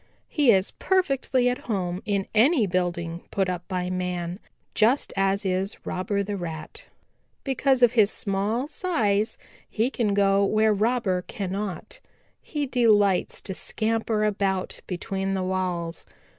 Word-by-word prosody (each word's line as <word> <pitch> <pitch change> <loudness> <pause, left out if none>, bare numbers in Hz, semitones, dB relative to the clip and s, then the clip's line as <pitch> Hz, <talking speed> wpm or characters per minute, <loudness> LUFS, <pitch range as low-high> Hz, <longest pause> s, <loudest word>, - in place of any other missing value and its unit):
He 290 -5 +2
is 190 -2 +3
perfectly 275 -9 +1
at 250 0 0
home 185 -3 -1
in 200 -2 0
any 240 +3 +4
building 175 -2 -2
put 195 -1 0
up 175 -1 -4
by 180 -1 -2
man, 180 0 -3 0.3
just 235 +6 +2
as 195 +1 +1
is 190 +2 -1
Robber 200 +2 -1
the 205 +1 -3
Rat. 165 -4 -6 0.6
Because 265 -1 +2
of 240 - +7
his 220 -4 +4
small 210 +7 -1
size 220 - 0 0.3
he 235 +4 0
can 210 -6 0
go 200 0 +3
where 215 +2 +3
Robber 210 -3 +1
cannot. 200 - -4 0.4
He 295 -2 -3
delights 215 -7 +2
to 190 - -5
scamper 220 +2 -1
about 195 -3 -1
between 195 +1 -2
the 190 - -1
walls. 180 -3 -2
200 Hz, 135 wpm, -25 LUFS, 185-225 Hz, 0.6 s, of